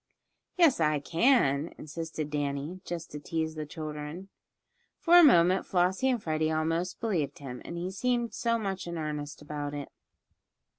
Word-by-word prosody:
"Yes, 330 - +5
I 150 -2 +2
can," 165 - +2
insisted 155 -1 -5
Danny, 145 +4 -3
just 170 -1 -5
to 150 - -6
tease 160 +1 -2
the 155 -1 -5
children. 155 +4 -6 0.7
For 350 +1 +6
a - - +8
moment 185 - +6
Flossie 185 +8 +2
and 250 -2 +1
Freddie 155 -4 0
almost 165 +3 -1
believed 165 - -1
him, 130 -3 -8
he 175 +2 -4
seemed 240 +2 -1
so 230 0 +1
much 195 -5 -4
in 170 0 -4
earnest 150 -1 -5
about 145 -1 -4
it. 145 -1 -6
165 Hz, 150 wpm, -29 LUFS, 150-190 Hz, 0.7 s, a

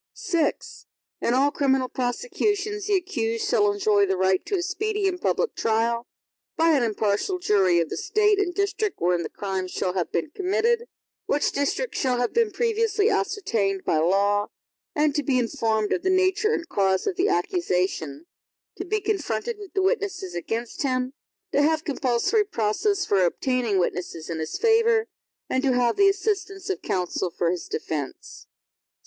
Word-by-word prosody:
VI 330 -3 +3 0.7
In 240 - +1
all 280 +2 +3
criminal 270 -3 +1
prosecutions, 410 - -2
the 415 - +3
accused 230 - -1
shall 205 -1 +3
enjoy 205 0 +2
the 190 0 0
right 190 0 +2
to 405 - 0
a 355 - -1
speedy 415 +2 -1
and 360 -1 -2
public 485 - 0
trial, 230 +2 0 0.5
by 330 +1 +4
an 290 -4 +3
impartial 220 - 0
jury 195 - +3
of 165 - -1
the - - -4
State 415 0 +2
and 395 -3 +1
district 400 0 -1
wherein 175 0 +1
the 165 - -4
crime 190 -2 -3
shall 180 0 -2
have 180 -3 -2
been 300 - -2
committed, 455 +7 +1 0.4
which 290 - +1
district 285 - -1
shall 255 -3 +1
have 245 0 -1
been 460 -1 +3
previously 450 0 +1
ascertained 225 - -1
by 155 - +2
law, 200 +5 +2 0.5
and 300 -1 +2
to 295 - 0
be 275 -3 +1
informed 225 -4 0
of - - -1
the 375 - 0
nature 375 +4 +2
and 335 -6 -2
cause 190 - +1
of 390 - -1
the 380 +2 +2
accusation; 185 - -1 0.5
to - - -4
be 430 - 0
confronted 410 - -2
with 405 0 -11
the 385 - +2
witnesses 390 - -1
against 225 +7 -4
him; 255 -1 -1 0.4
to 285 - +3
have 310 +1 +2
compulsory 270 - +1
process 385 - 0
for 195 -2 +2
obtaining 235 +3 0
witnesses 175 -2 -2
in 165 - -3
his 155 - -3
favor, 455 0 +3 0.4
and 260 - 0
to 270 -2 +2
have 245 -1 +2
the 400 0 +5
assistance 390 -1 -2
of 385 - -4
counsel 180 0 -1
for 170 0 0
his 180 - -4
defense. 150 -4 -5
280 Hz, 170 wpm, -25 LUFS, -, 0.7 s, the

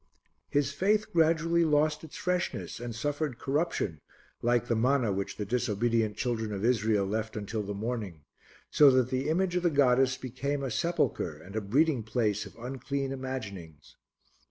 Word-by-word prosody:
His 140 -1 +1
faith 210 +7 +1
gradually 165 +1 +3
lost 150 0 +2
its 160 - -9
freshness 180 -8 -2
and 120 -1 -5
suffered 145 +1 -2
corruption 135 - -1 0.4
like 120 0 +2
the 115 - +1
manna 120 -2 +2
which 100 +1 -3
the 105 - -3
disobedient 115 -1 0
children 115 -3 -1
of 100 +1 -2
Israel 110 -4 +2
left 110 +2 -3
until 105 +1 -3
the 100 0 -5
morning, 105 -7 -4 0.5
so 145 -2 +7
that 130 -1 +3
the 130 +3 0
image 180 +2 +1
of 180 - +2
the 175 - +3
goddess 130 -3 +3
became 140 +3 -3
a 135 - -2
sepulchre 155 - -1
and 95 +6 -12
a 110 - 0
breeding 135 +6 +2
place 110 -2 -1
of - - -16
unclean 135 +3 -3
imaginings. 100 - -7
125 Hz, 160 wpm, -29 LUFS, 110-145 Hz, 0.5 s, so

